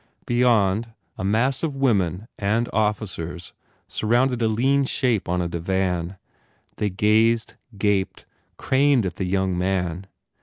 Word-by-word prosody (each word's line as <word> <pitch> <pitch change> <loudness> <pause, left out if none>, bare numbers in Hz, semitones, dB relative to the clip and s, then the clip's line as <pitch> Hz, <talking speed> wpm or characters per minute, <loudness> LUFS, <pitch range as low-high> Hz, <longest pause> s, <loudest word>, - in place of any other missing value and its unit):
Beyond, 115 -3 +2 0.2
a - - -6
mass 115 +7 +1
of 155 -4 -2
women 105 - 0
and 110 +4 +1
officers 100 -6 -2 0.3
surrounded 120 +3 +1
a 115 - +3
lean 135 +6 +2
shape 125 -8 0
on 90 0 0
a - - -2
divan. 90 +1 -2 0.6
They 105 - 0
gazed, 110 +3 +2 0.2
gaped, 100 -2 0 0.3
craned 135 -3 +2
at 95 - -4
the 95 - -2
young 95 0 0
man. 90 0 -2
105 Hz, 125 wpm, -23 LUFS, 95-120 Hz, 0.6 s, a